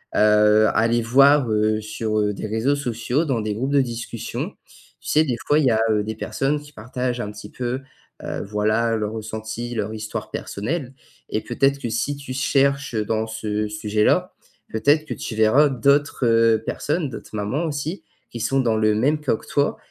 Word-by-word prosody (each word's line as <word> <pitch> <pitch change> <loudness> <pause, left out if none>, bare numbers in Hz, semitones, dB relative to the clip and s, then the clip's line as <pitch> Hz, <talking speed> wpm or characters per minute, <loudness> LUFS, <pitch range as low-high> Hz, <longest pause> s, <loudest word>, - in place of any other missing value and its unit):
heu, 105 0 +5
aller 115 +2 +2
voir, 135 +3 +5
heu, 110 0 +2
sur, 110 0 -2
heu, 105 -1 +1
des 100 - -5
réseaux 110 +7 +1
sociaux, 125 +1 -1
dans 130 -7 0
des 105 0 -2
groupes 130 +6 -2
de 140 -1 +4
discussion. 120 -2 -5 0.4
Tu - - -8
sais, 155 - +4
des 125 -6 -1
fois 145 - +4
il 150 - +2
y 125 - +4
a, 110 - +2
heu, 105 -1 +1
des 110 +1 -4
personnes 135 +6 -1
qui 145 0 -14
partagent 125 +2 -3
un 105 - -4
petit 105 0 -10
peu, 125 +1 -3 0.4
heu, - - -4
voilà, 110 +3 +1
leur 105 -1 -2
ressenti, 110 +2 -5
leur 110 -1 -2
histoire 110 0 -5
personnelle 130 +6 -4 0.4
et 110 - -1
peut-être 135 +4 +1
que 120 - -4
si 130 +6 -1
tu 140 -2 -7
cherches 140 0 +1
dans 110 +1 -1
ce 105 -1 -2
sujet-là, 105 0 +1 0.4
peut-être 145 +8 +2
que - - -4
tu 110 - -6
verras 110 +7 +5
d'autres, 140 +1 +2
heu, 115 -1 +4
personnes. 150 0 -1
D'autres 115 - -9
mamans 110 +11 -1
aussi 155 +4 -4 0.3
qui 120 - -6
sont 135 +4 +1
dans 115 -4 +2
le 110 -1 +3
même 145 +8 +2
cas 145 -6 +1
que - - -16
toi 145 0 +1
115 Hz, 190 wpm, -22 LUFS, 110-140 Hz, 0.4 s, heu